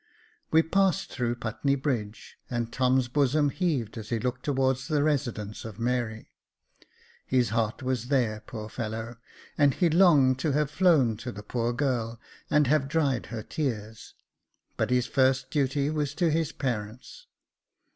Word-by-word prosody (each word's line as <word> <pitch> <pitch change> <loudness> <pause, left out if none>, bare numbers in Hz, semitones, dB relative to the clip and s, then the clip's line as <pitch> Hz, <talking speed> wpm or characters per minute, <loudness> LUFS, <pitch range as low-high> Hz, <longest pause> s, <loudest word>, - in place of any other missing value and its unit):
"We 160 +1 +5
passed 195 +3 +1
through 120 -2 -1
Putney 120 +4 -1
Bridge, 120 -7 -3
and 120 -2 -3
Tom's 130 0 +2
bosom 145 +2 +2
heaved 135 - -1
as 110 - -9
he 115 - 0
looked 125 +2 -3
towards 135 -1 0
the 150 -3 +1
residence 120 -9 -2
of 110 -3 -8
Mary. 120 -2 -2 1.0
His 125 -2 +2
heart 115 +3 -1
was 125 -2 -2
there, 120 -6 +1
poor 110 -3 -6
fellow! 115 +1 -5 0.4
and 145 -2 +4
he 175 -3 +2
longed 150 -7 +5
to 150 0 0
have 150 0 +1
flown 150 - +3
to 125 +3 -6
the 105 0 -9
poor 120 +2 -1
girl, 120 -3 -1 0.3
and 150 -1 +4
have 140 0 +2
dried 140 -4 0
her 115 -3 -6
tears; 110 -8 -4 0.6
but - - -1
his 125 -1 +2
first 130 0 +1
duty 140 0 +1
was 150 -2 -2
to 165 0 +2
his 160 -1 0
parents. 125 - -5
130 Hz, 155 wpm, -27 LUFS, 115-145 Hz, 1.0 s, We